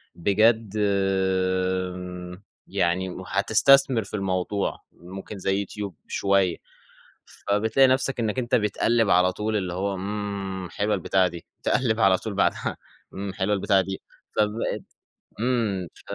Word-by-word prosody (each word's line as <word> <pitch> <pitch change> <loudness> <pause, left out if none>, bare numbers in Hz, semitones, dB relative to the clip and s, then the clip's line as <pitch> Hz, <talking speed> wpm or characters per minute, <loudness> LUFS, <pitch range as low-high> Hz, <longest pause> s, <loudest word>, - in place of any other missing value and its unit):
بجد 110 +3 +2 1.9
يعني 90 +2 0
هتستثمر 120 +4 +4
في 100 - -13
الموضوع 95 0 -1
ممكن 95 +4 -9
زي 95 +1 0
يوتيوب 100 -2 -5
شوية، 100 -3 +1 0.7
فبتلاقي 110 +6 +2
نفسك 130 0 +1
إنك 110 +2 0
أنت 120 -1 +1
بتقلّب 115 +1 +2
على 90 +1 +4
طول 110 +1 -2
اللي 90 -3 -3
هو 100 +2 -1
إمم، 100 -1 -4
حلوة 105 +3 0
البتاعة 95 0 +2
دي 85 -1 -9 0.2
تقلّب 115 -4 +1
على 95 -2 +5
طول 110 +1 -5
بعدها 100 - 0 0.4
إمم، 100 0 -5
حلوة 95 +1 0
البتاعة 95 0 +3
دي 95 +1 -5 0.4
فبقِت 105 +2 0 0.6
إمم، 110 -7 0
ف - - -16
100 Hz, 125 wpm, -25 LUFS, 95-110 Hz, 1.9 s, على